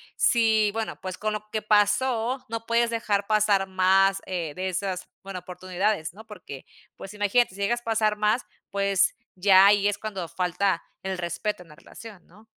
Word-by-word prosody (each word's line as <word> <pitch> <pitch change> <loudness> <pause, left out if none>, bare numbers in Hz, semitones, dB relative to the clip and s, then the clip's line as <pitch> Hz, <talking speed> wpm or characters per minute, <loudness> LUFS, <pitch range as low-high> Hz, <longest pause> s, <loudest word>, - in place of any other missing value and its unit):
si 220 -3 +3
bueno, 225 0 -4
pues, 185 -1 -5
con 215 0 -2
lo 215 0 -6
que 215 - -2
pasó, 225 +5 +1
no 230 0 -5
puedes 235 0 +2
dejar 210 -3 -1
pasar 210 -2 +2
más, 190 +1 +3
eh, 170 -5 -4
de 190 +1 -2
esas 185 0 -3 0.2
bueno, 195 -1 -6
oportunidades, 180 0 -2
¿no?, 220 +4 -13
porque, 180 -11 -10 0.3
pues, 195 - -10
imagínate, 205 +1 +1
si 200 - -8
llegas 240 +4 0
a - - -32
pasar 220 -2 +1
más, 215 +4 +1 0.3
pues, 200 -1 +1 0.2
ya 190 0 +6
ahí 205 0 +5
es 205 0 0
cuando 200 -5 -5
falta 180 +2 0 0.2
el 190 -1 -3
respeto 180 +3 -3
en 165 - -22
la 150 - -14
relación, 205 +2 -13
¿no? 210 +6 -20
200 Hz, 180 wpm, -25 LUFS, 185-215 Hz, 0.3 s, ya